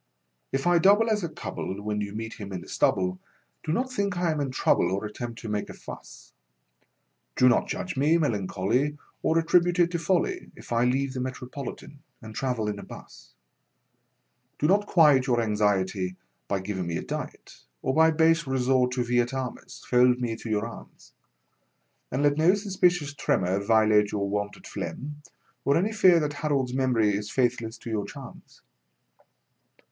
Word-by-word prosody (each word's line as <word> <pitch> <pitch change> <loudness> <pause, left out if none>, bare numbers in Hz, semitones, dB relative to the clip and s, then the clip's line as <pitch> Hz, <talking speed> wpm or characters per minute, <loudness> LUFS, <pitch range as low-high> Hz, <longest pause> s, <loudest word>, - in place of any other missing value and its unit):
If 135 0 -1
I 175 -1 +4
double 205 +6 +5
as 210 -2 0
a 170 - -2
cub'll 95 -9 -5
when 105 0 -2
you 100 0 -5
meet 110 0 -5
him 100 -2 -7
in 90 -2 -5
the - - -13
stubble, 90 -1 +1 0.4
Do 155 - -2
not 255 +8 -1
think 200 -5 -1
I 175 -2 +1
am 155 - -2
in 140 - -1
trouble 130 - +2
or 100 +3 -2
at 105 - -7
tempt 120 -1 -6
to 115 - -7
make 105 -1 -2
a - - -8
fuss; - - -11 1.0
Do 125 - +5
not 120 - +3
judge 185 - -4
me 150 +5 +3
melancholy 120 - 0 0.2
or 160 - +2
at 165 0 +1
tribute 175 0 +3
it 175 -1 +3
to 170 - -1
folly 190 - 0
If - - -14
I 120 +1 +2
leave 130 +2 0
the 130 - -4
Metropolitan 130 +2 -6 0.2
and 110 -1 -10
travel 125 -3 -2
'n 105 -1 -3
a - - -8
bus 60 0 -13 1.2
Do - - -1
not 205 +5 +3
quiet 145 -7 +5
your 120 -2 +2
anxiety 100 -4 0 0.3
by 100 -2 -1
giving 95 -2 -4
me 85 -1 -2
a - - -5
diet, - - -7 0.3
Or 130 - 0
by 160 +2 +5
base 165 0 +3
resort 130 -1 +2
to 125 -1 0
vi 120 +1 +1
et 120 +2 0
armis 130 -2 -6
fold 125 0 +4
me 120 -2 -2
to 115 - -8
your 105 0 0
arms, 115 - -12 1.0
And 135 +3 -1
let 145 0 +3
no 175 +5 +5
suspicious 180 -7 +1
tremor 95 -8 0
violate 110 0 +3
your 100 -1 -1
wonted 105 +1 -4
phlegm 150 +2 -6 0.4
or 140 - +3
Any 200 +6 +1
fear 185 -6 +5
that 150 -1 -2
Harold's 140 -4 -1
memory 120 -6 +2
is 105 +1 -4
faithless 120 -2 -1
to 115 - -8
your 105 -2 -2
charms. - - -12
125 Hz, 185 wpm, -26 LUFS, 105-160 Hz, 1.2 s, double